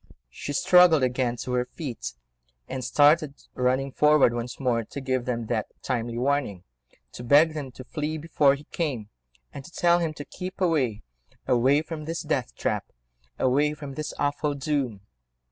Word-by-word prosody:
She 145 - -6
struggled 180 -2 +6
again 125 -1 0
to 125 - -5
her 125 0 +1
feet, 115 - -5 0.5
and 130 -1 -5
started 145 +3 +4 0.2
running 130 +2 0
forward 150 -3 +4
once 120 +1 -5
more 120 -4 +1
to 125 - -8
give 130 -2 -1
them 120 -2 -2
that 110 -1 -1 0.2
timely 120 -2 -2
warning, 125 -8 -1 0.5
to 120 - -9
beg 150 +6 +5
them 145 -4 -5
to 130 - -10
flee 150 +3 -3
before 150 -3 +3
he 140 - -12
came, 130 -11 -3 0.4
and 140 - -8
to - - -12
tell 175 0 +3
him 160 -3 -2
to 145 - -7
keep 185 +1 -7
away—away 125 - 0
from 160 -2 -7
this 165 +2 -4
death 60 - -2
trap—away 65 - -2
from 145 -2 -8
this 155 +1 -4
awful 145 0 -1
doom. 135 -7 -2
135 Hz, 160 wpm, -26 LUFS, 120-150 Hz, 0.5 s, struggled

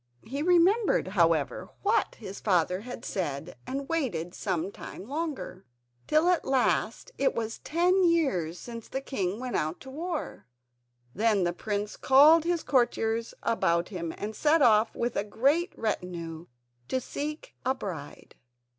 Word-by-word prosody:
He 275 +5 -4
remembered, 360 - +3
however, 165 -6 +1
what 420 +2 +2
his 200 -3 -8
father 180 -1 +1
had 245 +3 -8
said, 160 -4 -3
and 275 +1 -3
waited 190 - -2
some 185 -1 -2
time 200 - -9
longer, 290 - -4 0.4
till 310 +3 +3
at 360 - +2
last 265 - 0
it 275 - +2
was 225 0 -3
ten 360 +4 +2
years 265 - +2
since 230 +1 -8
the 265 - -3
king 205 -7 -3
went 255 -1 -4
out 155 +3 -1
to 265 - -10
war. 310 - -5 0.7
Then 210 -2 +2
the 175 0 0
prince 205 +2 -3
called 300 +5 +6
his 345 -1 0
courtiers 230 -3 +1
about 170 -6 +1
him 170 -5 -4
and 210 +1 -5
set 305 +5 +3
off 220 -2 +4
with 235 0 -2
a - - +1
great 280 - +1
retinue 175 -6 -4 0.4
to 260 - 0
seek 300 +4 -5
a 260 +1 +1
bride. 165 - -7
230 Hz, 145 wpm, -28 LUFS, 180-300 Hz, 0.7 s, called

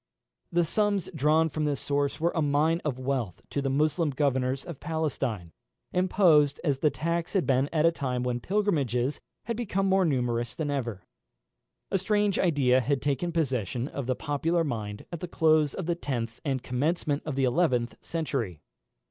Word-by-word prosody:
The 175 0 +3
sums 205 +2 0
drawn 155 +3 +3
from 155 0 -2
this 145 -2 0
source 145 +1 -1
were 170 +2 +2
a 165 - 0
mine 155 +3 +2
of 145 -5 -2
wealth 130 -8 -2
to 140 - -1
the 135 - -1
Moslem 155 +3 +1
governors 135 -2 0
of 170 -6 -8
Palestine, 135 - -2 0.4
imposed 170 -6 +4
as 140 -5 +1
the 150 - +3
tax 170 +4 -2
had 190 -4 +2
been 135 +1 +2
at 155 -1 +2
a 165 - +6
time 130 -6 -2
when 125 -1 -1
pilgrimages 145 - 0 0.2
had 235 - -3
become 195 -4 -1
more 190 0 +3
numerous 125 -5 0
than 145 0 -2
ever. 115 -9 -3 0.9
A 195 - +2
strange 205 0 +1
idea 135 -7 +3
had 140 +2 0
taken 145 +6 -1
possession 130 - -1
of 140 -3 -5
the 130 - +1
popular 165 +5 0
mind 110 -7 -4
at 170 - -5
the 180 - -5
close 155 -3 +3
of 185 - -4
the 170 - +1
tenth 120 -8 -4
and 135 -4 -1
commencement 145 +3 0
of 150 -4 -4
the 135 - +1
eleventh 125 -3 +2
century. 135 - -3
145 Hz, 175 wpm, -28 LUFS, 130-165 Hz, 0.9 s, a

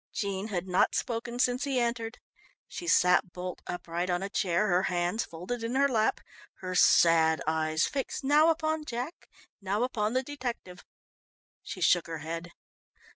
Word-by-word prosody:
Jean 200 0 -3
had 185 -3 -3
not 180 0 +2
spoken 235 0 -3
since 250 +1 +1
he 275 -3 0
entered. 235 -1 -2 0.5
She 345 - -7
sat 180 - +4
bolt 180 0 -6
upright 175 0 -3
on 175 +1 0
a 195 - -3
chair, 195 +1 +1
her 180 -1 +3
hands 175 +5 0
folded 180 +9 -6
in 230 +2 -2
her 280 +1 +4
lap, 220 -5 +1 0.4
her 185 -1 -4
sad 165 -3 +5
eyes 155 0 +1
fixed 275 0 -3
now 300 +4 +5
upon 315 -1 0
Jack, 255 +4 -6 0.3
now 200 +4 -1
upon 220 -3 -1
the 260 +1 +1
detective. 245 -10 -6 0.8
She 185 - -8
shook 175 0 +3
her 165 -1 -5
head. 165 +1 -5
200 Hz, 160 wpm, -29 LUFS, 175-245 Hz, 0.8 s, sad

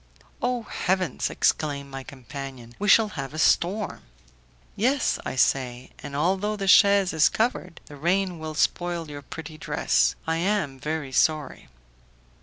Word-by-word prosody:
"Oh, 245 -1 -1
heavens!" 185 -7 -1
exclaimed 140 -2 0
my 135 0 -6
companion, 130 -2 -9
"we 205 - -2
shall 220 +1 +6
have 135 -5 -6
a - - -5
storm." 190 +6 +1 0.7
"Yes," 255 +6 +1
I - - -4
say, 125 -1 0
"and 140 - -7
although 190 +7 0
the 195 -2 -4
chaise 200 -1 +6
is 160 -1 +5
covered, 200 -7 -2
the 145 - -12
rain 180 +3 0
will 155 -1 -6
spoil 170 -1 -1
your 145 -1 -7
pretty 155 +2 -9
dress. - - +1
I 160 0 0
am 170 -7 -1
very 150 -1 -3
sorry." 150 +2 0
160 Hz, 145 wpm, -25 LUFS, 140-195 Hz, 0.7 s, shall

